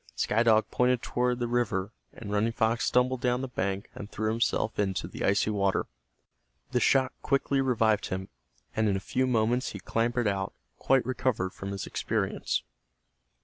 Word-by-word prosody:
Sky 110 Hz, -, +1 dB
Dog 110 Hz, -2 st, +4 dB
pointed 125 Hz, -1 st, +2 dB
toward 125 Hz, 0 st, 0 dB
the 120 Hz, -1 st, -1 dB
river, 110 Hz, -5 st, 0 dB, 0.2 s
and 105 Hz, -3 st, -8 dB
Running 105 Hz, +3 st, +1 dB
Fox 115 Hz, +1 st, +1 dB
stumbled 125 Hz, 0 st, +2 dB
down 125 Hz, -1 st, +1 dB
the 135 Hz, -, -3 dB
bank 100 Hz, -4 st, -2 dB
and 105 Hz, -, -8 dB
threw 110 Hz, +1 st, -1 dB
himself 115 Hz, -1 st, 0 dB
into 95 Hz, -3 st, 0 dB
the -, -, -6 dB
icy 100 Hz, +2 st, +2 dB
water. 100 Hz, -2 st, +1 dB, 0.9 s
The 125 Hz, -, +2 dB
shock 130 Hz, +1 st, +3 dB
quickly 140 Hz, 0 st, +1 dB
revived 115 Hz, -5 st, +2 dB
him, 95 Hz, +1 st, -4 dB, 0.5 s
and 110 Hz, -1 st, +2 dB
in 100 Hz, -, +1 dB
a -, -, 0 dB
few 130 Hz, +6 st, 0 dB
moments 120 Hz, +1 st, +1 dB
he 100 Hz, -, -6 dB
clambered 120 Hz, +3 st, 0 dB
out 95 Hz, -1 st, -1 dB, 0.3 s
quite 135 Hz, -2 st, +3 dB
recovered 125 Hz, -7 st, -1 dB
from 95 Hz, -, -6 dB
his 100 Hz, -1 st, -4 dB
experience. -, -, -1 dB
115 Hz, 170 wpm, -28 LUFS, 100-125 Hz, 0.9 s, Dog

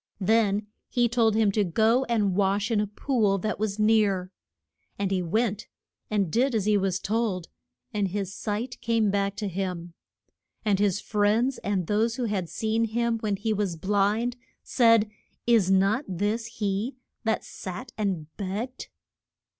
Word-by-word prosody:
Then 210 Hz, 0 st, +2 dB, 0.2 s
he 240 Hz, -1 st, +2 dB
told 225 Hz, -2 st, +2 dB
him 220 Hz, -2 st, +3 dB
to 210 Hz, +1 st, +2 dB
go 225 Hz, +8 st, +2 dB
and 210 Hz, -6 st, +1 dB
wash 200 Hz, +2 st, +1 dB
in 215 Hz, -2 st, +3 dB
a 210 Hz, -, -1 dB
pool 210 Hz, -2 st, +1 dB
that 215 Hz, +2 st, -3 dB
was 210 Hz, -1 st, -1 dB
near. 210 Hz, -4 st, +2 dB, 0.7 s
And 200 Hz, -1 st, -1 dB
he 190 Hz, -1 st, +1 dB
went, 210 Hz, +4 st, -1 dB, 0.4 s
and 200 Hz, -6 st, 0 dB
did 250 Hz, -, +2 dB
as 210 Hz, -3 st, +1 dB
he 210 Hz, 0 st, +3 dB
was 190 Hz, -2 st, +1 dB
told, 205 Hz, -4 st, -1 dB, 0.4 s
and 205 Hz, -2 st, +1 dB
his 195 Hz, 0 st, -3 dB
sight 225 Hz, +5 st, -4 dB
came 225 Hz, -3 st, +2 dB
back 200 Hz, 0 st, 0 dB
to 210 Hz, -1 st, -3 dB
him. 180 Hz, -2 st, -4 dB, 0.7 s
And 200 Hz, -2 st, +2 dB
his 200 Hz, -2 st, +2 dB
friends, 220 Hz, +6 st, +1 dB
and 195 Hz, -3 st, -1 dB
those 220 Hz, +5 st, +1 dB
who 255 Hz, -, -3 dB
had 200 Hz, -7 st, -1 dB
seen 220 Hz, +1 st, 0 dB
him 230 Hz, +1 st, 0 dB
when 210 Hz, -2 st, -1 dB
he 215 Hz, +3 st, -1 dB
was 200 Hz, -4 st, -1 dB
blind, 205 Hz, +7 st, +1 dB, 0.3 s
said, 230 Hz, -3 st, +4 dB, 0.4 s
Is 225 Hz, -6 st, +4 dB
not 195 Hz, +7 st, +3 dB
this 205 Hz, +5 st, -1 dB
he 210 Hz, +5 st, -2 dB, 0.3 s
that 220 Hz, -1 st, 0 dB
sat 215 Hz, +7 st, -7 dB
and 195 Hz, -7 st, -1 dB
begged? 215 Hz, +6 st, -4 dB
210 Hz, 160 wpm, -26 LUFS, 195-225 Hz, 0.7 s, said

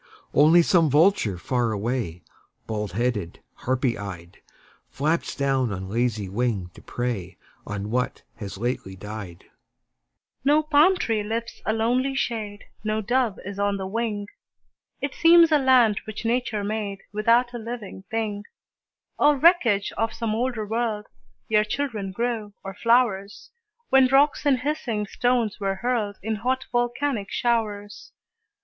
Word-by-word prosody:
Only 160 Hz, +4 st, +6 dB
some 165 Hz, -3 st, +3 dB
vulture 145 Hz, -, +3 dB
far 120 Hz, +6 st, -1 dB
away, 105 Hz, -5 st, -3 dB, 0.4 s
Bald 105 Hz, -4 st, -4 dB
headed, 105 Hz, -6 st, -2 dB
harpy 130 Hz, -3 st, -1 dB
eyed, 90 Hz, -4 st, -8 dB, 0.5 s
Flaps 155 Hz, +4 st, -1 dB
down 135 Hz, -4 st, +1 dB
on 95 Hz, -1 st, -5 dB
lazy 110 Hz, -2 st, -1 dB
wing 100 Hz, -3 st, -2 dB
to -, -, -14 dB
prey 120 Hz, -7 st, -4 dB, 0.3 s
On 105 Hz, 0 st, -4 dB
what 125 Hz, +1 st, -1 dB
has 100 Hz, -4 st, -7 dB
lately 110 Hz, -4 st, -3 dB
died. 100 Hz, -3 st, -8 dB, 1.0 s
No 295 Hz, +3 st, +4 dB
palm 310 Hz, +5 st, +4 dB
tree 225 Hz, -9 st, 0 dB
lifts 225 Hz, +3 st, -4 dB
a 220 Hz, -, +2 dB
lonely 250 Hz, +4 st, +1 dB
shade, 215 Hz, -5 st, -3 dB, 0.2 s
No 215 Hz, 0 st, -1 dB
dove 240 Hz, -1 st, 0 dB
is 200 Hz, 0 st, -6 dB
on 200 Hz, 0 st, +1 dB
the 190 Hz, -, -4 dB
wing; 210 Hz, 0 st, -2 dB, 0.8 s
It 280 Hz, -1 st, -2 dB
seems 335 Hz, 0 st, +6 dB
a 300 Hz, -, +5 dB
land 250 Hz, -6 st, +4 dB
which 215 Hz, +1 st, -7 dB
Nature 230 Hz, -3 st, 0 dB
made 205 Hz, -1 st, -3 dB
Without 235 Hz, +3 st, +3 dB
a 240 Hz, -, -4 dB
living 225 Hz, -4 st, -7 dB
thing, 210 Hz, -2 st, -3 dB, 0.7 s
Or 295 Hz, -1 st, +5 dB
wreckage 260 Hz, -, +4 dB
of 225 Hz, 0 st, -1 dB
some 225 Hz, -2 st, -2 dB
older 235 Hz, -1 st, -1 dB
world, 220 Hz, -1 st, -2 dB, 0.5 s
Ere 210 Hz, -1 st, +5 dB
children 215 Hz, -4 st, -3 dB
grew, 220 Hz, -1 st, -3 dB
or 195 Hz, -, -6 dB
flowers, 215 Hz, -3 st, +1 dB, 0.4 s
When 265 Hz, -1 st, +6 dB
rocks 285 Hz, +3 st, +3 dB
and 260 Hz, -3 st, +3 dB
hissing 250 Hz, -7 st, -2 dB
stones 240 Hz, 0 st, 0 dB
were 195 Hz, -1 st, -1 dB
hurled 215 Hz, -2 st, -1 dB
In 220 Hz, 0 st, -2 dB
hot, 255 Hz, +4 st, -1 dB
volcanic 240 Hz, -2 st, -1 dB
showers. 210 Hz, -4 st, -2 dB
210 Hz, 140 wpm, -24 LUFS, -, 1.0 s, Only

